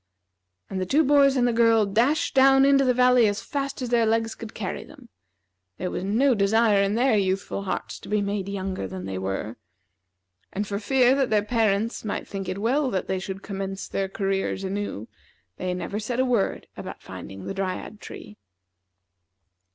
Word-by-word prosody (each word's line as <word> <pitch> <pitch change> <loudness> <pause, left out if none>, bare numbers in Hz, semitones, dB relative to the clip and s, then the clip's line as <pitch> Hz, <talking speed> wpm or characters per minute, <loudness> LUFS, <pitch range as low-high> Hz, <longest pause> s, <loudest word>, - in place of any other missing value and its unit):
And 190 -1 -4
the - - 0
two 300 +8 +3
boys 280 -1 +5
and 245 -2 +3
the 240 - +1
girl 230 -2 +4
dashed 235 +10 +1
down 270 0 +6
into 275 0 +5
the 255 - +3
valley 250 -2 +5
as 205 -1 -1
fast 275 -2 -3
as 245 - -3
their 235 -2 +3
legs 225 0 +1
could 225 -1 -10
carry 195 -4 -4
them. 265 -6 -16 0.7
There 180 - -3
was - - -3
no 240 +8 +3
desire 210 0 +3
in 200 +1 +1
their 245 0 +3
youthful 195 0 -1
hearts - - -4
to - - -12
be 210 0 +2
made 200 -1 -2
younger 190 - -3
than 95 0 -7
they 95 -1 -4
were. 95 +4 -4 0.9
And 205 +2 -2
for 200 0 -3
fear 250 +4 +3
that 270 -2 +1
their 210 -1 +2
parents 220 -1 0
might 215 - -4
think 195 -2 -5
it 185 - -3
well 260 +7 +1
that 190 -6 -2
they 190 0 -1
should 190 +1 -6
commence 195 -1 -5
their 195 -1 -2
careers 195 -1 -2
anew, 195 - -4 0.5
they 185 0 -2
never 200 +3 -4
said 235 +3 -3
a 260 - +3
word 240 -6 0
about - - -8
finding 95 -1 -9
the - - -4
Dryad 195 +2 -4
tree. 105 - -10
210 Hz, 190 wpm, -25 LUFS, 195-245 Hz, 0.9 s, down